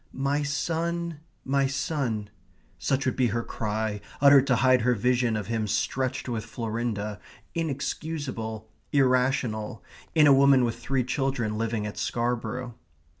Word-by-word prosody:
My 140 +2 0
son, 165 +2 -2 0.3
my 135 0 +2
son 130 -6 -2 0.5
such 135 -1 0
would 130 - 0
be 130 -2 +3
her 115 +1 -1
cry, 110 -2 -3 0.2
uttered 140 -1 +7
to 130 - +4
hide 130 0 +4
her 125 +2 +3
vision 120 0 +1
of 105 - -3
him 110 0 -1
stretched 130 +6 -1
with 115 -3 -2
Florinda, 110 -3 -3 0.3
inexcusable, 140 -7 -3 0.2
irrational, 125 -5 +1 0.3
in 155 -2 +6
a 145 - +8
woman 135 -1 +6
with 115 -1 -1
three 135 -1 0
children 130 -4 -1
living 110 -1 -1
at 105 - -5
Scarborough. 120 +1 -2
125 Hz, 135 wpm, -27 LUFS, 110-140 Hz, 0.5 s, a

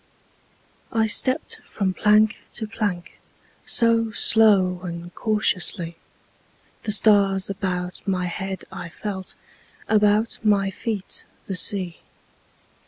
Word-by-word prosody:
I 225 -1 +2
stepped 255 +6 +1
from 190 -3 -2
plank 210 +2 +3 0.2
to 220 - -2
plank 205 -5 -4 0.5
So 230 -1 +4
slow 200 -5 +4
and 175 -1 -7
cautiously; 185 -5 0 0.9
The 215 - 0
stars 200 -2 +3
about 180 -2 -4
my 185 -2 0
head 190 +1 -5
I 175 - -7
felt, 190 +1 -6 0.5
About 210 +1 +2
my 200 -2 +2
feet 205 -1 -4 0.2
the 195 - -5
sea. 185 -1 -1
200 Hz, 105 wpm, -23 LUFS, 185-215 Hz, 0.9 s, So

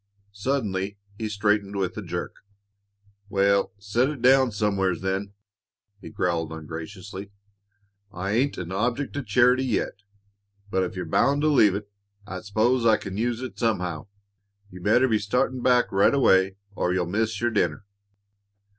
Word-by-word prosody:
Suddenly 100 -4 -2 0.2
he 110 -1 -2
straightened 105 -1 0
with 95 -2 -1
a - - -4
jerk. - - -5 0.9
"Wal, 100 -1 +2
set 105 +7 0
it 150 -3 -5
down 130 0 +5
somewheres, 100 -4 0
then!" 95 +1 -2 0.7
he - - -10
growled 85 -3 -1
ungraciously. 90 +5 -8 0.8
"I 95 0 -4
ain't 130 +6 +1
an 90 0 -5
object 120 +9 -1
o' - - -1
charity 125 +3 +3
yet, 110 -4 -2 0.7
but 95 - +1
if 95 - -3
you're 90 -1 -4
bound 140 - +2
to 155 - +4
leave 105 -9 +5
it, 100 0 -5 0.4
I 95 -2 -6
s'pose 115 +5 +1
I 110 -2 +5
can 95 -1 -7
use 120 +2 -1
it 130 - -7
somehow. 90 -8 -1 0.6
You'd 90 0 -10
better 120 +5 +4
be 110 -3 +2
startin' 125 +4 0
back 125 0 +3
right 100 +7 +4
away 95 -8 +4 0.2
or 90 - -1
you'll 90 -1 +1
miss 105 +4 -1
your 120 0 0
dinner." 90 -4 0
100 Hz, 155 wpm, -25 LUFS, 95-120 Hz, 0.9 s, down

